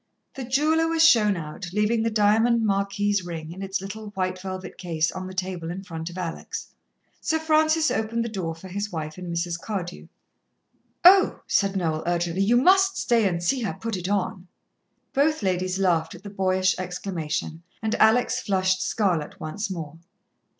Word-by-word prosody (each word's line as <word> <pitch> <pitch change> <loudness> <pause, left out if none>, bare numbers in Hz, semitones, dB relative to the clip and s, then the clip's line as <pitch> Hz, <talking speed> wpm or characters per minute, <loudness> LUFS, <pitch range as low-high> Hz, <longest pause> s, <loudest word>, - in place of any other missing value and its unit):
The 270 - -6
jeweller 305 +6 +2
was 330 0 +4
shown 210 - +4
out, 160 +3 -6
leaving 210 +2 +2
the 230 - +1
diamond 225 +2 +3
marquise 200 0 0
ring, 165 -2 -6
in 185 +3 -8
its 195 -1 -2
little 210 +3 -7
white 185 -1 -2
velvet 185 -1 -7
case, 165 -3 0
on 185 0 -6
the 185 - -8
table 180 -3 -3
in 185 +3 -5
front 165 -3 -6
of 175 - -10
Alex. 170 -3 -5 0.5
Sir 320 - 0
Francis 315 0 +3
opened 230 +1 -1
the - - -2
door 185 -7 -4
for 165 +3 -11
his 205 +3 -4
wife 155 0 -5
and 180 -1 -6
Mrs. 170 0 -2
Cardew. 185 -5 -5 1.0
"Oh," 380 +1 +7
said 195 -1 +1
Noel 160 -4 0
urgently. 175 +1 0
"You 225 +5 +4
must 385 +7 +4
stay 230 -4 +2
and 175 -2 -2
see 255 +8 +1
her 220 - -2
put 230 -2 -3
it 180 0 -4
on." 190 -2 -2 0.7
Both 295 -1 +2
ladies 185 0 0
laughed 170 -4 +1
at - - -14
the 205 - -8
boyish 185 -1 +2
exclamation, 170 -4 -4 0.2
and 220 0 0
Alex 245 +3 +4
flushed 185 -2 +1
scarlet 180 -8 -1
once 195 +7 -4
more. 165 -3 -6
195 Hz, 175 wpm, -25 LUFS, 175-225 Hz, 1.0 s, Oh